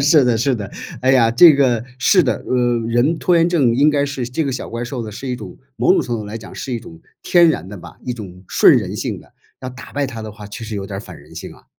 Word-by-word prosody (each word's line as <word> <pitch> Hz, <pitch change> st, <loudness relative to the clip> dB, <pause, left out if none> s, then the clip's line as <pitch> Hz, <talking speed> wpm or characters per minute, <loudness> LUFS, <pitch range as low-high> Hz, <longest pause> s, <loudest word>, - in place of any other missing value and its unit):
是 145 Hz, 0 st, +5 dB
的 120 Hz, -2 st, +2 dB
是， 125 Hz, +2 st, +1 dB, 0.5 s
哎 130 Hz, -, +3 dB
呀， 120 Hz, -4 st, +4 dB
这 155 Hz, +7 st, +7 dB
个， 125 Hz, -5 st, +2 dB
是 180 Hz, +8 st, +4 dB
的！ 125 Hz, -, +1 dB
呃， 130 Hz, -, -3 dB, 0.3 s
人 125 Hz, +8 st, +1 dB
拖 175 Hz, -1 st, +2 dB
延 165 Hz, -, +4 dB
症 145 Hz, -10 st, +2 dB
应 145 Hz, +3 st, +4 dB
该 145 Hz, -1 st, +1 dB
是 135 Hz, -4 st, -4 dB
这 125 Hz, +6 st, -2 dB
个 140 Hz, -, -1 dB
小 130 Hz, -, -5 dB
怪 115 Hz, +1 st, -4 dB
兽 120 Hz, 0 st, -5 dB
的 110 Hz, -2 st, -7 dB
是 125 Hz, +5 st, -7 dB
一 125 Hz, -, -2 dB
种 -, -, -10 dB, 0.2 s
某 -, -, +3 dB
种 -, -, +3 dB
程 120 Hz, -, -3 dB
度 115 Hz, -, -3 dB
上 -, -, -9 dB
来 105 Hz, +2 st, -6 dB
讲 110 Hz, -, -12 dB
是 130 Hz, -, -6 dB
一 115 Hz, -, -2 dB
种 80 Hz, -8 st, -13 dB, 0.2 s
天 175 Hz, -2 st, +5 dB
然 95 Hz, -, -4 dB
的 105 Hz, -, -8 dB
吧， 90 Hz, -, -13 dB
一 125 Hz, -, -2 dB
种 95 Hz, -5 st, -10 dB
顺 -, -, +6 dB
人 -, -, -2 dB
性 -, -, -4 dB
的。 -, -, -21 dB, 0.3 s
要 130 Hz, -, -5 dB
打 130 Hz, 0 st, -11 dB
败 145 Hz, -1 st, -1 dB
它 115 Hz, -4 st, -7 dB
的 110 Hz, -, -7 dB
话， 105 Hz, -1 st, -11 dB
其 105 Hz, +3 st, -8 dB
实 110 Hz, -1 st, -6 dB
有 100 Hz, -1 st, -4 dB
点 95 Hz, -, -6 dB
儿 -, -, -5 dB
反 -, -, -12 dB
人 -, -, -17 dB
性 -, -, -8 dB
啊！ -, -, -21 dB
125 Hz, 310 characters per minute, -19 LUFS, 115-140 Hz, 0.5 s, 这